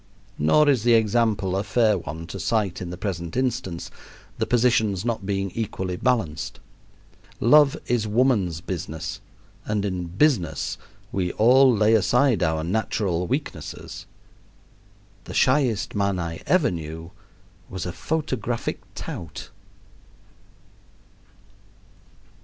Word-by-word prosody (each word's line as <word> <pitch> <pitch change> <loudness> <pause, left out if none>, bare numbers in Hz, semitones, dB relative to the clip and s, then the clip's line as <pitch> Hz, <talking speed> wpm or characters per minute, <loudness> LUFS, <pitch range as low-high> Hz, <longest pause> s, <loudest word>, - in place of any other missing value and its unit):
Nor 110 - +4
is 135 -6 +4
the 120 +1 +4
example 110 -4 +2
a 100 - 0
fair 110 +1 +3
one 80 -2 -6
to 85 - -7
cite 105 -5 0
in 90 - -5
the 90 - -6
present 90 -1 -4
instance, 125 -9 -2 0.5
the - - 0
positions 110 -5 +2
not 110 -5 -2
being 100 -1 -1
equally 95 -4 -3
balanced. 90 -9 -1 0.8
Love 145 +4 +5
is 115 -3 0
woman's 105 -8 +1
business, 80 -3 -5 0.4
and 105 -1 -1
in 90 -3 -3
"business" 90 - +1 0.3
we 90 -2 -1
all 130 +4 +6
lay 110 -1 +3
aside 120 +3 +3
our 80 -2 +1
natural 90 -1 -1
weaknesses - - -5 1.2
the - - -8
shyest 110 - +2
man 100 -2 0
I 85 -2 -4
ever 180 - +3
knew 80 0 -6 0.6
was 95 -2 -5
a 90 - -4
photographic 130 - -2
tout. 80 -3 -7
100 Hz, 115 wpm, -24 LUFS, 90-120 Hz, 1.2 s, all